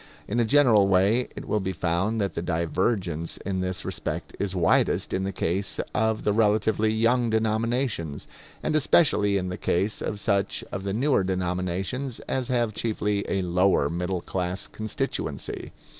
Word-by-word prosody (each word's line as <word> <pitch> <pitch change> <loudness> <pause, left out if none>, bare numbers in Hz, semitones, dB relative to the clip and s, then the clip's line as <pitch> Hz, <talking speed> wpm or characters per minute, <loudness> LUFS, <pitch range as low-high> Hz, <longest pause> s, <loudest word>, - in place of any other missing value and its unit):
In 115 +4 -1
a 120 - +3
general 115 -6 +5
way 100 +6 +3
it - - -7
will 105 - +1
be 95 -1 -2
found 90 +6 0
that 100 -2 -1
the - - -3
divergence 85 0 -1
in 95 -1 -1
this 95 0 -3
respect - - -4
is 100 -2 -2
widest 85 -3 +2
in 95 0 0
the 100 - -1
case 95 +2 -1
of 110 0 +1
the 105 - +2
relatively 110 0 +2
young 115 +2 +2
denominations, 110 - -1 0.4
and - - 0
especially 120 -9 +4
in 90 -1 -2
the 90 - -4
case 95 +5 0
of 105 - -3
such 100 -2 0
of 95 - -5
the 100 - -1
newer 130 -1 +2
denominations 95 +7 -2
as 130 -2 -2
have 120 -4 0
chiefly 105 -2 -1
a 95 -1 0
lower 90 -4 +2
middle 90 +1 -2
class 90 +1 -2
constituency. 110 -1 -4
100 Hz, 160 wpm, -26 LUFS, 90-110 Hz, 0.4 s, general